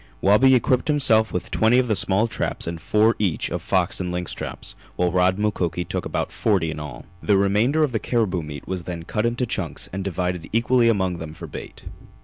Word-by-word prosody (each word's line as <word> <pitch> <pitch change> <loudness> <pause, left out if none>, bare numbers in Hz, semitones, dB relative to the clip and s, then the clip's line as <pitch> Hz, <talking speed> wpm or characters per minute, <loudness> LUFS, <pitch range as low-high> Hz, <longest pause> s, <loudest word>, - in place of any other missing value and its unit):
Wabi 125 +7 +5
equipped 125 +1 +1
himself 115 -7 +3
with 90 - -4
twenty 110 +3 +3
of 130 -1 +2
the 110 - +1
small 100 +3 +2
traps 115 - -3
and 85 0 -5
four 110 +2 +3
each 95 -6 0
of - - -3
fox 95 +1 0
and 90 -1 -3
lynx 90 0 -3
traps, - - -7 0.2
while 90 -1 +1
Rod 90 +1 +3
and 105 - -2
Mukoki 90 -4 -1
took - - -4
about - - -2
forty 95 -7 +1
in 80 - -6
all. 75 -5 -8 0.2
The 100 -2 +3
remainder 105 +10 +2
of 145 - +1
the 110 - -1
caribou 105 -8 0
meat 75 -2 -8
was 90 -3 -4
then 85 -2 -5
cut 105 +6 -1
into 120 +2 -1
chunks - - -4
and 95 0 -3
divided 90 -2 -3
equally 115 +1 +3
among 95 -5 0
them 80 -1 -7
for - - -8
bait. - - -10
100 Hz, 215 wpm, -23 LUFS, 90-115 Hz, 0.2 s, Wabi